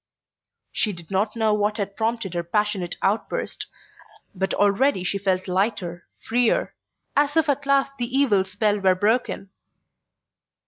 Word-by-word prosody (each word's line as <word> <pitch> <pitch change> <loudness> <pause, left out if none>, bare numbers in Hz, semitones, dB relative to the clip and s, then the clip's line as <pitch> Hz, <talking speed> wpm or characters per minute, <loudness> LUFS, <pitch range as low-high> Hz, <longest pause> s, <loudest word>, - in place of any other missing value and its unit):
She 210 - 0
did 170 -1 -12
not 205 +3 0
know 220 -2 +2
what 210 0 0
had 200 -1 -3
prompted 225 -4 -1
her 175 - -1
passionate 190 0 -1
outburst, 205 +4 -1 0.7
but 190 0 -2
already 205 +1 +2
she 200 +2 -1
felt 190 -1 0
lighter, 185 -2 -1 0.2
freer, 240 0 +1 0.4
as 290 +2 +2
if 320 - +4
at 285 -1 0
last 275 0 +2
the 245 +2 -1
evil 220 -9 +4
spell 205 +2 0
were 190 -1 +3
broken. 210 -1 0
210 Hz, 140 wpm, -24 LUFS, 190-240 Hz, 0.7 s, if